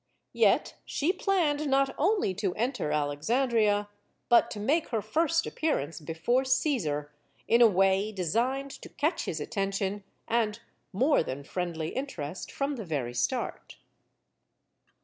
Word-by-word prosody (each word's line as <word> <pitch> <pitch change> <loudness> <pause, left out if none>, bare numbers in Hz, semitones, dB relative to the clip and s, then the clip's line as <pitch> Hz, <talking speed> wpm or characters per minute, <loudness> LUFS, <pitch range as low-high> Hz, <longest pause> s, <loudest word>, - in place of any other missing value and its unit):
Yet - - +3
she 320 +6 0
planned 325 -7 +1
not 270 0 +2
only 380 - +1
to 190 -1 -2
enter 235 - -1
Alexandria, 205 - +1 0.4
but 240 - +5
to 210 - -6
make 290 +10 +1
her 230 - -1
first 330 +8 +1
appearance 165 - -2
before 165 - 0
Caesar 200 - 0 0.4
in 235 +1 +4
a 235 - +9
way 195 +1 +2
designed 235 - -1
to - - -10
catch 320 +4 -1
his 160 - -3
attention 195 +2 -2 0.2
and 225 -2 0 0.3
more 260 +10 +3
than 140 -2 -5
friendly 165 -1 -3
interest 185 - -5
from 280 0 -2
the 225 - -5
very 135 -7 -2
start. 120 -1 -2
215 Hz, 130 wpm, -29 LUFS, 175-275 Hz, 0.4 s, a